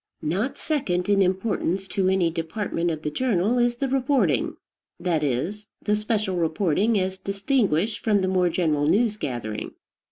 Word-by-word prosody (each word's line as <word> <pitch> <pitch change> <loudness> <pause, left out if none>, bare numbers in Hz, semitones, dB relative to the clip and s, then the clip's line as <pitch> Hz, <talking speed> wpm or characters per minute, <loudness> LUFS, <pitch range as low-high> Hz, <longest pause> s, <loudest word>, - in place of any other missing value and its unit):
Not 195 - -1
second 200 - -1
in 200 -1 +4
importance 190 -1 0
to 190 -1 +1
any 185 -3 +2
department 170 +1 -2
of 155 -2 -4
the 150 - -2
journal 230 +2 +1
is 240 0 +2
the 275 +3 -1
reporting; 260 - +1 0.4
that 170 -3 0
is, 170 - -2
the 210 - +1
special 210 -3 -1
reporting 175 +6 +1
as 190 0 -2
distinguished 200 - 0
from 210 -3 +3
the 190 - 0
more 185 -1 +2
general 155 -4 +1
news 215 +5 +3
gathering. 120 - -5
190 Hz, 155 wpm, -24 LUFS, 165-215 Hz, 0.4 s, in